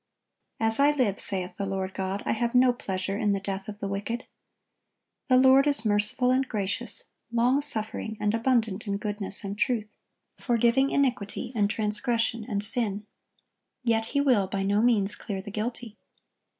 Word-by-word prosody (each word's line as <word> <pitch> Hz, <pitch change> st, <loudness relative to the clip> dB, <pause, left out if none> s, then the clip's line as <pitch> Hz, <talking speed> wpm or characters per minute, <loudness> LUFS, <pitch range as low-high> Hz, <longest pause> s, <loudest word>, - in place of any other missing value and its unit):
"As 225 Hz, +1 st, +3 dB
I 285 Hz, +1 st, +6 dB
live, 255 Hz, -9 st, +1 dB
saith 185 Hz, -2 st, -3 dB
the 200 Hz, -, -2 dB
Lord 190 Hz, -1 st, -3 dB
God, 190 Hz, +1 st, -3 dB
I -, -, 0 dB
have 235 Hz, +2 st, -1 dB
no 250 Hz, 0 st, +5 dB
pleasure 195 Hz, -3 st, -3 dB
in 205 Hz, -1 st, +2 dB
the 195 Hz, -, -1 dB
death 195 Hz, 0 st, -5 dB
of 205 Hz, -, -7 dB
the 200 Hz, -, -4 dB
wicked."(1072) 205 Hz, +5 st, -4 dB, 1.0 s
The 255 Hz, -2 st, +5 dB
Lord 265 Hz, +2 st, +6 dB
is 280 Hz, -6 st, 0 dB
"merciful 210 Hz, +4 st, +1 dB
and 260 Hz, +1 st, +1 dB
gracious, 210 Hz, +1 st, -3 dB, 0.3 s
long 245 Hz, +4 st, +2 dB
suffering, 220 Hz, -3 st, -2 dB
and 210 Hz, 0 st, 0 dB
abundant 225 Hz, -3 st, 0 dB
in 200 Hz, 0 st, -1 dB
goodness 205 Hz, -1 st, -4 dB
and 200 Hz, 0 st, -4 dB
truth,... 215 Hz, -1 st, -1 dB, 0.4 s
forgiving 240 Hz, +2 st, +2 dB
iniquity 240 Hz, -5 st, -1 dB
and 205 Hz, -3 st, +1 dB
transgression 225 Hz, +2 st, 0 dB
and 205 Hz, -2 st, -1 dB
sin." 210 Hz, -2 st, +2 dB, 0.8 s
Yet 225 Hz, -2 st, +1 dB
He 280 Hz, -, 0 dB
will 245 Hz, -9 st, +3 dB
"by 195 Hz, 0 st, -2 dB
no 200 Hz, +2 st, +2 dB
means 215 Hz, -4 st, +4 dB
clear 195 Hz, -2 st, -5 dB
the 205 Hz, +2 st, -8 dB
guilty." 225 Hz, +1 st, -4 dB
215 Hz, 165 wpm, -27 LUFS, 200-245 Hz, 1.0 s, I